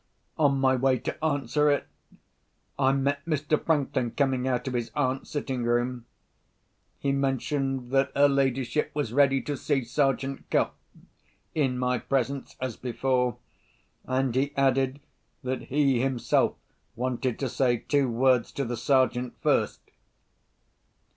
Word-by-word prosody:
On 145 -3 +3
my 130 -1 +3
way 130 0 +2
to 155 - -6
answer 150 -1 +1
it, 145 - +1 0.9
I 135 -1 +4
met 140 +1 0
Mr. 155 -1 0
Franklin 140 -6 +1
coming 130 0 0
out 125 0 -1
of 130 - -2
his 120 -2 -2
aunt's 135 -2 -1
sitting 135 -4 -3
room. 120 0 0 0.9
He 140 - -1
mentioned 135 -1 -1
that 135 0 +2
her 140 +1 +6
ladyship 135 0 0
was 145 -7 -2
ready 135 -1 +3
to 145 - -3
see 140 -1 0
Sergeant 135 +1 -1
Cuff—in 135 -5 -3
my 125 -1 0
presence 135 0 -2
as 130 -3 -4
before—and 130 0 -3
he 135 +3 0
added 135 0 +2 0.4
that 130 0 -3
he 135 -3 +2
himself 130 -2 +1 0.4
wanted 125 0 -2
to 135 - -2
say 125 -1 +1
two 140 +2 +1
words 125 0 +2
to 140 - -2
the 120 0 -3
Sergeant 125 0 +1
first. - - +1
135 Hz, 130 wpm, -27 LUFS, 125-140 Hz, 0.9 s, her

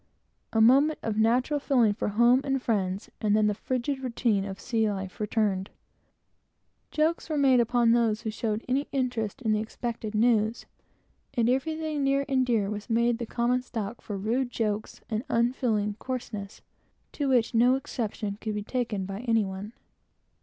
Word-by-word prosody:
A 225 - +1
moment 275 +7 +5
of 220 -2 -1
natural 250 +6 +2
feeling 245 -7 +3
for 205 - -3
home 235 +5 +4
and 270 -1 0
friends, 195 -5 -2
and 210 -1 +2
then 215 0 +3
the 210 - +2
frigid 255 +5 -2
routine 230 -5 0
of 195 0 -6
sea 225 -2 0
life 190 -2 -5
returned. 210 -3 0 1.2
Jokes 320 +2 0
were 310 - -1
made 265 -3 +5
upon 235 0 +3
those 230 -2 +2
who 220 - -3
showed 215 0 -3
any 270 +3 0
interest 250 -3 -2
in 220 - +1
the 215 - +2
expected 225 0 -5
news, 220 0 +2 0.7
and 235 -1 +2
everything 305 +3 -1
near 275 0 +2
and 260 -2 +1
dear 220 -5 +2
was 210 +3 -6
made 235 +1 +1
common 245 +1 +1
stock 230 -2 -5
for 205 - -5
rude 240 +6 0
jokes 215 -3 -3
and 220 +1 -2
unfeeling 230 -3 +1
coarseness, 220 -6 -6 0.5
to 285 -2 -2
which 245 -3 +2
no 245 +3 +5
exception 215 -5 -4
could 215 -1 -3
be 210 - -3
taken 225 -5 -2
by 195 +1 -5
any 225 -2 +3
one. 190 +2 -6
230 Hz, 165 wpm, -27 LUFS, 210-255 Hz, 1.2 s, moment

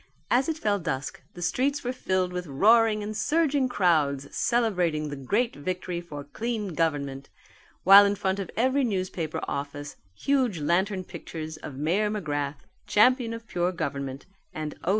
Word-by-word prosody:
As 255 +5 +3
it 320 - -1
fell 205 -8 0
dusk 135 -4 -4
the 175 - -6
streets 275 +10 0
were 250 +1 -2
filled 185 -6 -1
with 180 -1 -4
roaring 215 +8 +4
and 215 +1 -5
surging 285 +2 +1
crowds 150 - +1
celebrating 180 -11 +1
the 145 - -5
great 205 - 0
victory 180 +2 -3
for 145 -4 -8
clean 215 +6 -3
government, 140 -4 -1 0.5
while 195 +2 +10
in 200 0 +2
front 195 -1 -1
of 195 - -4
every 260 +4 +2
newspaper 185 -7 -2
office 145 +1 -5 0.2
huge 260 - +1
lantern 185 +5 +1
pictures 155 -3 -7
of 150 -3 -8
Mayor 175 +10 +1
McGrath 145 -8 -3
the - - -30 0.3
Champion 245 +2 +4
of 230 0 -7
Pure 180 -4 -1
Government, 140 -5 -4 0.3
and 155 -1 -4
_O. - - -3
185 Hz, 160 wpm, -27 LUFS, 150-225 Hz, 0.5 s, while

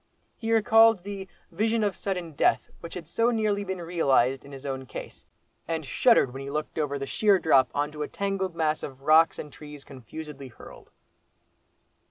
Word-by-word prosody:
He 225 0 -4
recalled 225 -3 +5
the 195 -1 -6 0.2
"vision 220 +5 0
of 200 -3 0
sudden 180 -4 -4
death" 145 - +1
which 170 - -9
had 170 -4 -7
so 230 +7 +1
nearly 215 -3 0
been 190 -2 -4
realised 135 -7 +1
in 140 - -13
his 135 0 -10
own 130 -1 -4
case, - - -9 0.4
and 160 -1 -3
shuddered 230 - +4
as 125 - -13
he 135 0 -6
looked 155 +2 -4
over 145 -2 -1
the 135 - -4
sheer 200 +7 +3
drop 135 -8 +4
on 145 +1 0
to 150 0 -8
a 150 - -2
tangled 195 -3 -3
mass 155 -2 0
of 135 -1 -8
"rocks 160 +2 +5
and 150 - -8
trees 150 -2 -11
confusedly 140 +2 -9
hurled." 120 - -14
160 Hz, 185 wpm, -27 LUFS, 140-200 Hz, 0.4 s, recalled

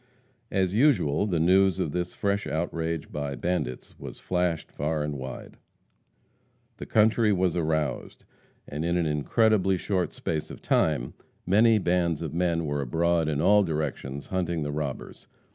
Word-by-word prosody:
As 95 -2 0
usual, 105 - +3
the 90 -5 0
news 95 +2 +4
of 75 - -1
this 90 +1 -3
fresh 100 -2 -1
outrage 80 0 -3
by 70 -1 -3
bandits 65 -4 -3
was - - -8
flashed 90 -3 -1
far 75 +1 -2
and 75 -1 -3
wide. 65 -2 -8 1.2
The - - -8
country 110 0 +3
was 90 -3 +1
aroused, 80 -3 -2 0.4
and 75 +2 -4
in 85 +1 +1
an 85 - +1
incredibly 95 +6 +2
short 90 -1 -1
space 80 -2 -3
of - - -9
time - - +1 0.3
many 110 +4 +5
bands 85 -4 0
of 80 - -5
men 85 -1 0
were 70 -1 -1
abroad 80 +4 +1
in 75 -1 -1
all 105 +4 +5
directions, 75 -5 -3
hunting 85 -4 -2
the 75 - -3
robbers. 75 -2 -5
85 Hz, 150 wpm, -27 LUFS, 75-95 Hz, 1.2 s, many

